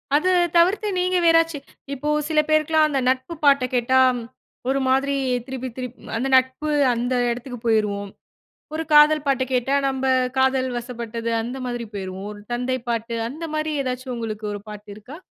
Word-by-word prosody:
அது 365 +5 +2 0.3
தவிர்த்து 385 +5 +3
நீங்க 365 0 +1
வேறாச்சி, 330 -2 +4 0.4
இப்போ 285 +2 -5 0.2
சில 310 -1 +3
பேருக்குலாம் 310 0 +3
அந்த 280 -3 -1
நட்பு 260 +5 -1
பாட்ட 275 -2 +5
கேட்டா 260 +2 +3 0.7
ஒரு 275 0 +1
மாரி 275 +2 +2 0.3
திருப்பி, 260 -1 -5
திருப்பி 250 -1 -6 0.2
அந்த 260 +3 -1
நட்பு 260 +4 0 0.2
அந்த 245 +2 -1 0.2
எடத்துக்கு 245 0 -5
போயிருவோம். 205 -3 0 0.6
ஒரு 320 +1 -2
காதல் 300 0 +6
பாட்ட 265 -1 +2
கேட்டா 250 +2 +1
நம்ப 265 0 -2 0.3
காதல் 265 0 +2
வசப்பட்டது 235 -1 -5
அந்த 245 +4 -5
மாதிரி 240 -1 -4
போயிருவோம். 190 0 -6
ஒரு 205 - -12
தந்தை 255 +1 -1
பாட்டு 230 0 -2
அந்த 315 +5 -8
மாரி 310 0 -1
ஏதாச்சும் 255 0 -4
உங்களுக்கு 215 -2 -5
ஒரு 205 - -6
பாட்டு 210 0 -10
இருக்கா? 250 +9 -11
260 Hz, 155 wpm, -22 LUFS, 235-295 Hz, 0.7 s, காதல்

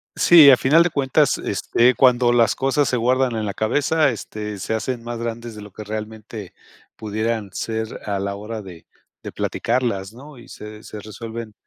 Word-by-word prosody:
Sí, 160 -5 +8
a 130 - +7
final 155 +5 +4
de 175 - 0
cuentas, 135 -4 +1
este, 120 +2 +1
cuando 120 -1 +4
las 115 -2 +3
cosas 135 0 +1
se 125 - 0
guardan 125 0 +1
en 110 - -2
la 100 - -3
cabeza, 145 +7 +1
este, 105 -3 -6
se 105 - -3
hacen 115 +2 -3
más 120 0 -5
grandes 115 0 -5
de 105 - -9
lo 105 -1 -11
que 110 - -9
realmente 110 -1 -7 0.4
pudieran 110 -1 -3
ser 110 0 -4
a 100 -2 -2
la 100 0 -3
hora 110 +2 -6
de 90 -4 -12 0.4
de - - -8
platicarlas, 115 -5 -2
¿no?, 140 +4 -13
y 120 - -14
se 105 0 -10
se 110 - -10
resuelven 110 +1 -8
115 Hz, 185 wpm, -21 LUFS, 105-125 Hz, 0.4 s, Sí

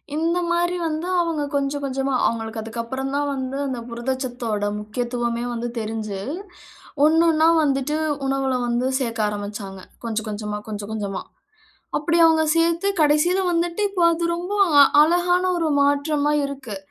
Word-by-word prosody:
இந்த 330 +3 +1
மாரி 350 +1 +1
வந்து 315 +2 -3
அவங்க 330 -3 -1
கொஞ்சம் 280 0 -1
கொஞ்சமா 270 0 -1
அவங்களுக்கு 225 -1 -2
அதுக்கப்புறம் 235 +4 -4
தான் 290 0 0
வந்து 265 0 -4
அந்த 260 -3 -3
புரதச்சத்தோட 240 -3 -3
முக்கியத்துவமே 235 +2 -3
வந்து 235 0 -3
தெரிஞ்சு, 215 -2 -4 0.9
ஒண்ணு 320 +2 +4
ஒண்ணா 315 +1 +3 0.2
வந்துட்டு 275 +1 0 0.3
உணவுல 270 -1 0
வந்து 240 +2 0
சேர்க்க 230 -3 -3
ஆரம்பிச்சாங்க. 205 -1 -5 0.3
கொஞ்சம் 220 -1 -3
கொஞ்சமா, 210 0 -4
கொஞ்சம் 205 -1 -6
கொஞ்சமா, 205 -3 -3 0.8
அப்படி 335 +3 +1
அவங்க 320 -1 +3
சேர்த்து 335 +3 +2
கடைசியில 305 +5 +3
வந்துட்டு 340 +2 -1
இப்போ 375 -3 -1
அது 340 +1 -2
ரொம்ப 360 +4 -4 0.5
அழகான 355 +3 +2
ஒரு 330 -2 0
மாற்றமா 285 +1 +2
இருக்கு. 270 -7 -6
270 Hz, 135 wpm, -22 LUFS, 230-315 Hz, 0.9 s, ஒண்ணு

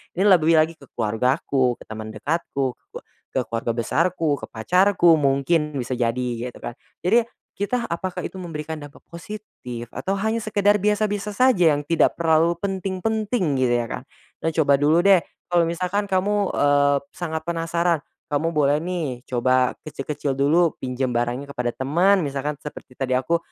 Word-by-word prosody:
ini 190 - +1
lebih 165 -4 +5
lagi 160 +1 +3
ke 140 - -15
keluargaku, 125 +3 +1
ke - - -11
teman 110 0 -7
dekatku, 135 0 -2 0.6
ke - - +3
keluarga 115 0 -2
besarku, 160 +4 0
ke - - -8
pacarku, 175 - +3
mungkin 145 +2 +1
bisa 125 -1 -3
jadi 125 +1 0 0.2
gitu - - -14
kan? 120 - -4 0.3
Jadi, 230 +6 +3 0.3
kita 235 +4 -1
apakah 180 +1 -4
itu - - -6
memberikan 160 -2 -6
dampak 145 0 -13
positif, 170 - -8
atau 195 +1 -2
hanya 220 +3 -1
sekedar 205 -1 +2
biasa-biasa 210 0 0
saja 245 -10 +5
yang 145 - -6
tidak 165 +1 +2
terlalu 165 0 +3
penting-penting, 195 - -1
gitu 125 - +3
ya, 120 - -1
Kak. - - -6 0.4
Nah 165 - +1
coba 155 -3 +2
dulu 160 +5 +4
deh, 195 -3 +7 0.3
kalau 175 - +5
misalkan 185 +4 -2
kamu, 200 +1 +1
eee, 145 0 +3 0.2
sangat 160 -2 -4
penasaran, 170 -1 0 0.2
kamu 145 +3 -1
boleh 145 +1 +3
nih, 160 -8 -3
coba 130 +1 +2
kecil-kecil 145 -1 -3
dulu, 155 +4 +3
pinjam 125 0 -2
barangnya 120 +3 -1
kepada 125 -2 -1
teman, 170 +9 +2
misalkan 140 +1 -3
seperti 140 -3 -10
tadi 130 -1 -1
aku 130 +7 +2
160 Hz, 155 wpm, -23 LUFS, 135-185 Hz, 0.6 s, deh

